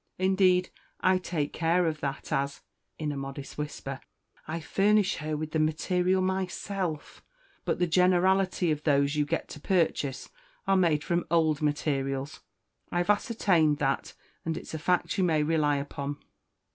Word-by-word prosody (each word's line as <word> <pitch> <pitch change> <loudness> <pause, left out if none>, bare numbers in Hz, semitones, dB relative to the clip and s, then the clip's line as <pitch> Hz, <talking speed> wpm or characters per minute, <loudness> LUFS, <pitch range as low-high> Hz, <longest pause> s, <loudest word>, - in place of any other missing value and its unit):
Indeed, 185 -1 +3 0.3
I 185 0 +4
take 165 -5 -3
care 170 +2 +2
of 155 -2 -1
that, 140 +2 -4
as" 140 -1 -1 0.4
(in 150 -2 -2
a - - -4
modest 135 0 -6
whisper) 140 -2 -5 0.5
"I 160 +2 -3
furnish 200 +5 +2
her 155 -1 -3
with 155 0 -4
the 160 - 0
material 180 +4 +1
myself; 185 -3 -3 0.4
but - - 0
the 180 - +2
generality 180 0 +3
of 150 -1 -1
those 140 -1 +2
you 150 -1 +2
get - - -2
to - - -8
purchase 155 -6 0 0.4
are 195 -1 +3
made 165 -5 +3
from 175 -1 0
old 160 -3 +2
materials. 140 -2 -1 0.5
I've 175 +3 +2
ascertained 190 - +2
that, 135 -2 -1 0.3
and 160 -1 -2
it's - - -8
a 160 - -3
fact 180 +4 0
you - - +3
may 160 -4 +2
rely 150 -2 +2
upon." 140 0 -4
160 Hz, 155 wpm, -28 LUFS, 150-185 Hz, 0.5 s, I